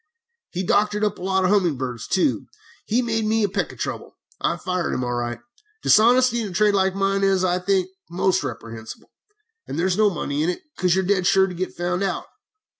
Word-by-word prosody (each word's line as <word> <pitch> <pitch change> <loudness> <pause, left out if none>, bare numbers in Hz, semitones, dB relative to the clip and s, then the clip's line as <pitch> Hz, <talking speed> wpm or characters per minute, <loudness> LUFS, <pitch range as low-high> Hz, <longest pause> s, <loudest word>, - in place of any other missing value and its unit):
"He 185 +1 -3
doctored 210 +3 +1
up 210 -1 0
a - - -11
lot 190 0 +1
of 185 - +2
humming 180 -8 +2
birds, 125 -3 -5
too, 195 +9 +1 0.4
and 240 +3 +2
made 225 -1 0
me 220 +1 +1
a - - +3
peck 190 - -2
of - - -14
trouble. - - -5 0.2
I - - 0
fired 180 -2 -2
him, 130 - -2
all 120 0 -2
right. 120 0 -2 0.5
Dishonesty 240 +2 +5
in 215 - -3
a - - -9
trade 210 +3 +3
like 190 -1 +2
mine 195 0 +1
is, 195 -1 +3
I 180 0 +1
think, 185 0 +1 0.2
most 185 +1 +1
reprehensible, 115 -3 -8 0.6
and - - -5
there 170 - +1
is 190 +2 0
no 215 -1 +5
money 150 -5 -3
in 160 - +1
it, 180 - -4
because 180 -1 +2
you 190 - +1
are - - -4
dead 185 -2 +2
sure 190 0 +5
to 185 - -6
get 185 +2 -4
found 175 +1 -1
out. 195 -3 -2
190 Hz, 225 wpm, -23 LUFS, 175-205 Hz, 0.6 s, Dishonesty